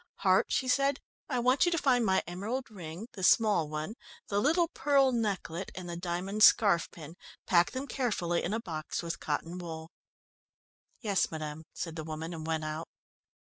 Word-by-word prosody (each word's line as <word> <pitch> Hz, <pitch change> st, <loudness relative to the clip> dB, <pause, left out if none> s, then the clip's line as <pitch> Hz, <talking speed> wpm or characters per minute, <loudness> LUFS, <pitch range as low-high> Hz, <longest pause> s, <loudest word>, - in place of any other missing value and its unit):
"Hart," -, -, +4 dB
she 260 Hz, -, +1 dB
said, 275 Hz, +1 st, +2 dB, 0.3 s
"I 260 Hz, -, 0 dB
want 255 Hz, +3 st, +3 dB
you -, -, +3 dB
to 335 Hz, -, +1 dB
find 255 Hz, -5 st, +3 dB
my 190 Hz, -3 st, +2 dB
emerald 220 Hz, +8 st, -4 dB
ring, 180 Hz, +1 st, -8 dB
the 200 Hz, -, -8 dB
small 200 Hz, -5 st, +4 dB
one, 155 Hz, +6 st, -4 dB, 0.4 s
the 200 Hz, 0 st, +1 dB
little 330 Hz, -, +3 dB
pearl 275 Hz, -4 st, +3 dB
necklet, 200 Hz, -6 st, -2 dB
and 185 Hz, -1 st, -6 dB
the 170 Hz, -, -4 dB
diamond 180 Hz, +4 st, -3 dB
scarf 200 Hz, -6 st, +6 dB
pin. 160 Hz, 0 st, -11 dB, 0.3 s
Pack 175 Hz, -1 st, +4 dB
them 260 Hz, +2 st, -4 dB
carefully 205 Hz, -12 st, -1 dB
in 175 Hz, -, -2 dB
a 220 Hz, -, 0 dB
box 160 Hz, -5 st, -4 dB
with 165 Hz, -2 st, -4 dB
cotton 165 Hz, +4 st, -3 dB
wool." 165 Hz, -1 st, -7 dB, 1.1 s
"Yes, 200 Hz, -6 st, +1 dB
madam," 155 Hz, 0 st, -6 dB
said 165 Hz, -1 st, -5 dB
the 160 Hz, -, -4 dB
woman, 160 Hz, +2 st, -5 dB
and 160 Hz, -1 st, -6 dB
went 160 Hz, -1 st, -1 dB
out. 155 Hz, +2 st, -5 dB
180 Hz, 175 wpm, -30 LUFS, 165-235 Hz, 1.1 s, scarf